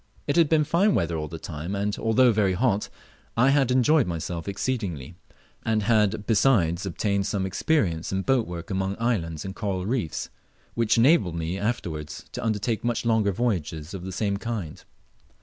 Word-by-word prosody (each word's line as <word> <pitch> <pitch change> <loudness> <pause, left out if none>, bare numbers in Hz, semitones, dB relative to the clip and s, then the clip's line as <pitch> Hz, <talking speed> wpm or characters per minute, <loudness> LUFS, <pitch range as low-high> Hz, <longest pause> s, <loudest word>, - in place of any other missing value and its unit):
It 145 - 0
had 165 -3 +4
been 155 -2 +3
tine 190 +7 +3
weather 85 -4 0
all 75 -1 -3
the 80 +2 -7
time, 80 +4 -5
and, 100 +1 -1
although 120 +2 +4
very 100 -3 +2
hot, 105 0 +1 0.5
I 130 +4 +5
had 135 -3 +3
enjoyed 130 - +4
myself 85 0 -4
exceedingly, 95 - -3 0.5
and 110 -1 +1
had 105 -1 +2
besides 100 -6 +2
obtained 100 +2 -1
some 95 -2 -1
experience 95 - 0
in 95 0 -1
boat 130 -1 +2
work 85 0 -7
among 95 +1 -1
islands 85 -10 -1
and 95 +1 -6
coral 95 -4 -2
reefs, 110 - -2 0.4
which 115 -1 +2
enabled 115 - +4
me 85 +2 -2
afterwards 85 -9 -3
to - - -5
undertake 110 +1 -1
much 120 0 -1
longer 110 -3 +2
voyages 90 -7 -2
of 95 -2 -6
the 95 - -5
same 100 +1 -1
kind. 105 -8 -5
100 Hz, 170 wpm, -25 LUFS, 85-120 Hz, 0.5 s, I